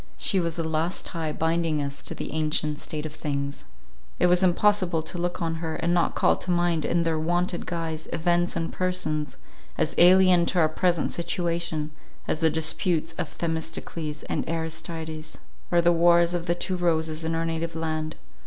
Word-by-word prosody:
She 195 - +2
was 170 -2 -1
the 165 -1 -2
last 160 +3 -1
tie 160 -3 -3
binding 160 -1 0
us 140 0 -3
to - - -6
the - - -5
ancient 155 -1 0
state 155 -1 -5
of 155 - -5
things. 140 -2 -3 0.5
It - - +3
was 180 +1 +5
impossible 185 -2 +3
to 175 - -5
look 175 0 -2
on 165 0 -1
her, 160 -1 -3
and 170 +1 0
not 175 -1 +2
call - - +4
to - - -9
mind 175 -3 +2
in 170 0 +1
their 165 -1 0
wonted 175 +2 0
guise, 165 -2 -3
events 175 +1 +1
and 165 -1 -2
persons, 170 -5 -1 0.4
as - - 0
alien 180 -1 +6
to 180 - +1
our 160 -2 +4
present 170 0 +1
situation 170 -3 -2 0.4
as 155 - 0
the 160 -1 +4
disputes 160 +1 0
of 155 - -2
Themistocles 160 -2 -3
and - - -2
Aristides, 160 -1 -4 0.3
or 175 -1 +5
the 170 0 +4
wars 170 0 +4
of 175 0 -2
the 170 - +2
two 185 +1 -2
roses 160 -2 0
in 165 0 -1
our 165 0 0
native 165 0 -2
land. 155 -1 -2
165 Hz, 180 wpm, -26 LUFS, 155-175 Hz, 0.5 s, alien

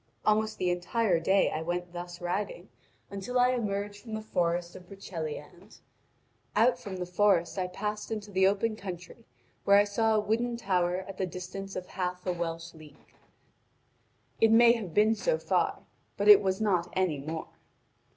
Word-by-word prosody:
Almost 215 0 +2
the 180 -1 +1
entire 180 +1 +1
day 190 +4 +3
I 155 - -3
went 175 +1 -3
thus 175 0 -7
riding 190 - -3 0.4
until 200 +6 -2
I 250 0 +5
emerged 205 -3 -3
from 220 -3 -6
the 220 - -4
forest 175 -3 -1
of 180 -1 -12
Broceliande. 175 -1 -8 0.8
Out 245 +2 +4
from 195 -3 -7
the 180 - -3
forest 180 0 +2
I 180 - -1
passed 210 +3 -4
into 210 -2 -5
the 190 0 +4
open 210 +3 0
country 180 -4 -9 0.4
where 200 0 +6
I 205 - +6
saw 220 +2 +1
a - - +4
wooden 230 +3 -1
tower 185 -3 0
at 195 -1 -9
the 190 - 0
distance 185 +2 -7
of 185 - -4
half 180 -1 -4
a 180 - 0
Welsh 165 -1 -4
league: 155 -2 -17 1.3
it 225 - +5
may 235 +1 +7
have 215 -8 -3
been 215 +1 +5
so - - 0
far, - - 0 0.3
but - - 0
it 415 -1 +10
was 190 0 0
not 180 -5 +1
anymore. 160 -3 -2
190 Hz, 170 wpm, -29 LUFS, 175-215 Hz, 1.3 s, it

